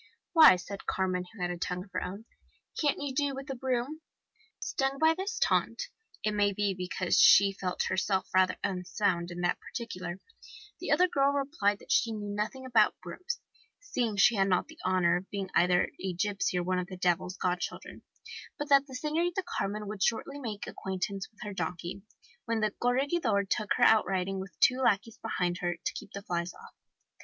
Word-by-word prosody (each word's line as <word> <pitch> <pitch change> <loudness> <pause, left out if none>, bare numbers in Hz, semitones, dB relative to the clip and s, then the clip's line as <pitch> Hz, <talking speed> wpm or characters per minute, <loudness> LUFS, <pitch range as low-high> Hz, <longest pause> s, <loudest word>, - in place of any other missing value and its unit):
'Why,' 315 - +9
said 195 +2 -8
Carmen, 185 -1 0
who 225 - -15
had 175 - 0
a 175 - -5
tongue 180 +1 -3
of 195 - -19
her 185 - -2
own, 200 +5 -7 0.5
'can't 295 -2 +1
you 285 -2 -3
do 285 0 0
with 270 0 -7
a - - -3
broom?' 260 +4 -2 0.6
Stung 270 0 -1
by 315 +2 +5
this 395 +6 -4
taunt, - - +1 0.3
it 215 - +1
may 205 -1 +2
be 200 0 0
because 185 0 0
she 195 0 +7
felt 185 -2 -2
herself 190 0 0
rather 185 0 +3
unsound 185 -2 -1
in 175 0 -6
that 175 - +1
particular, 185 -7 -6 0.6
the - - -5
other 365 - +5
girl 280 -4 +2
replied 275 -8 0
that - - -10
she 230 -2 +3
knew 205 -1 -5
nothing 220 +6 -3
about 230 -4 +3
brooms, 365 - -5 0.4
seeing 245 - -2
she 220 +4 +6
had 195 0 +3
not 180 +5 +1
the 320 0 -15
honour 185 -2 +3
of 185 +2 -8
being 195 -2 -4
either 180 0 +3
a 190 -1 -1
gipsy 195 0 -1
or 175 - 0
one 185 +1 0
of 180 - -4
the 185 - -8
devil's 180 +1 0
godchildren, 180 0 -3 0.6
but 295 0 -4
that 280 0 +5
the 260 - -9
Senorita 335 +7 -1
Carmen 210 - -3
would 210 -1 -6
shortly 275 +7 0
make 220 -6 -5
acquaintance 190 +1 -4
with 220 - -21
her 205 -1 -5
donkey, 175 +1 -4 0.4
when 230 -1 0
the 215 -1 +1
Corregidor 245 -3 +2
took 210 +2 0
her - - +1
out 220 -3 +6
riding 190 0 -1
with 190 -4 -9
two 255 +1 +5
lackeys 225 -2 +1
behind 175 -1 -1
her 175 -1 -1
to 170 - -4
keep - - -9
the 200 - -6
flies 175 -1 -3
off. - - -14
200 Hz, 195 wpm, -30 LUFS, 185-260 Hz, 0.6 s, Why